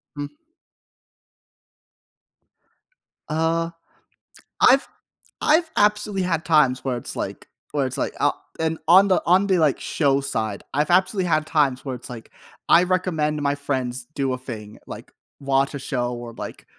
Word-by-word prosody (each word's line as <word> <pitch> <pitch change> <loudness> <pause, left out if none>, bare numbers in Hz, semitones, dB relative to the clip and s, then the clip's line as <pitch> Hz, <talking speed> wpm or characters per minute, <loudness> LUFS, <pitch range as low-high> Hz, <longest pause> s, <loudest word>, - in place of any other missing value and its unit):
Hmm. 145 0 -5 3.0
Uh, 165 +2 0 0.9
I've 270 +2 +5 0.6
I've 320 +2 +3
absolutely 210 -1 +2
had 170 -1 -1
times 150 -6 +3
where 130 -2 -1
it's 120 - -6
like - - -5 0.2
where 140 -3 0
it's 130 - -4
like, - - -2
"Uh," - - +3 0.3
and 160 0 0
on 190 +4 +7
the 185 - +2
on 185 +3 +4
the, 190 -2 +3
like, 155 -4 +2
show 140 -3 +1
side, 110 -7 -3
I've 150 +4 +1
absolutely 185 +1 +2
had 155 -2 +1
times 145 -6 +1
where 130 -2 -3
it's 125 - -10
like, 120 -2 -10 0.4
I 170 - +7
recommend 165 -5 0
my 140 0 +1
friends 130 -4 -3
do 135 -2 0
a - - -3
thing, 110 -4 -9
like, - - -9 0.3
watch 135 0 +1
a - - -4
show, 125 -2 -2
or, 120 -1 -8
like, - - -8
150 Hz, 150 wpm, -23 LUFS, 130-175 Hz, 3.0 s, on